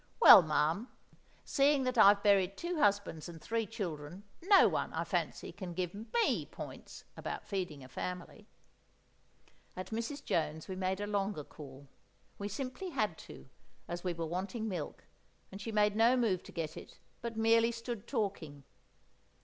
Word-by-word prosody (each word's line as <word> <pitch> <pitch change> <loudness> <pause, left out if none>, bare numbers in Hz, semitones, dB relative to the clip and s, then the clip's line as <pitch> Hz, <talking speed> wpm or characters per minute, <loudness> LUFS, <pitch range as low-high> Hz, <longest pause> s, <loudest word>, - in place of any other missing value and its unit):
"Well, 330 - +11
ma'am, 155 +7 0 0.6
seeing 280 -1 +3
that 255 0 -1
I've 200 -2 +7
buried 195 -2 +3
two 345 -1 -3
husbands 200 - +1
and 165 -1 -9
three 225 +4 -2
children, 175 -5 -6 0.2
no 390 +3 +7
one, - - -1
I - - -1
fancy, - - -2
can 180 -4 -7
give 180 -1 -2
me 230 - 0
points - - -9
about - - -5
feeding 180 -8 -4
a - - -11
family!" 180 - -6 1.3
At 185 0 -7
Mrs. 235 +6 -4
Jones's 160 -1 -1
we 190 - -5
made 190 +1 -1
a - - -1
longer 200 -5 -1
call; 140 -1 -12 0.5
we 200 - -3
simply 260 - -5
had 215 - -1
to, - - -12 0.4
as 175 0 -5
we 180 -2 -1
were 165 0 -3
wanting 195 +7 -3
milk, 180 -7 -5 0.5
and 195 +1 -8
she 225 - -4
made 210 -1 +2
no 230 +3 +5
move 210 -7 +1
to - - -11
get 160 -3 -4
it, - - -11 0.2
but 235 -1 -5
merely 230 +1 +4
stood 230 -1 -6
talking. 190 - -3
200 Hz, 160 wpm, -33 LUFS, 175-230 Hz, 1.3 s, Well